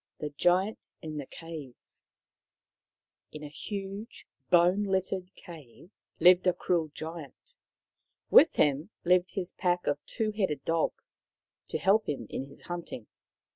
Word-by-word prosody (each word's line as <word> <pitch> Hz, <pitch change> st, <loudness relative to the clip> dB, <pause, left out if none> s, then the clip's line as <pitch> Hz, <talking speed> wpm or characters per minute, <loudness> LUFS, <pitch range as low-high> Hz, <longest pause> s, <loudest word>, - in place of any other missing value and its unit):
THE 150 Hz, -1 st, -4 dB
GIANT 180 Hz, +7 st, +1 dB
IN 155 Hz, -1 st, -5 dB
THE 140 Hz, -3 st, -5 dB
CAVE 155 Hz, -7 st, -9 dB, 1.6 s
In 150 Hz, -, -9 dB
a 150 Hz, -, -6 dB
huge 195 Hz, +7 st, -6 dB, 0.2 s
bone 180 Hz, +3 st, +5 dB
littered 190 Hz, -1 st, -2 dB
cave 165 Hz, -, -13 dB, 0.3 s
lived 180 Hz, +2 st, +6 dB
a 180 Hz, -, +5 dB
cruel 175 Hz, -2 st, 0 dB
Giant. 160 Hz, -3 st, -8 dB, 0.8 s
With -, -, +7 dB
him 145 Hz, +4 st, +2 dB
lived 180 Hz, +1 st, +3 dB
his 185 Hz, -2 st, -1 dB
pack 180 Hz, -2 st, 0 dB
of 145 Hz, 0 st, -1 dB
two 220 Hz, -1 st, -1 dB
headed 190 Hz, -10 st, -1 dB
dogs, 165 Hz, -1 st, -2 dB, 0.5 s
to -, -, -2 dB
help 210 Hz, +3 st, +3 dB
him 135 Hz, -6 st, -3 dB
in 135 Hz, -, -3 dB
his 140 Hz, -, -14 dB
hunting. 170 Hz, -10 st, -6 dB
175 Hz, 135 wpm, -29 LUFS, 150-190 Hz, 1.6 s, With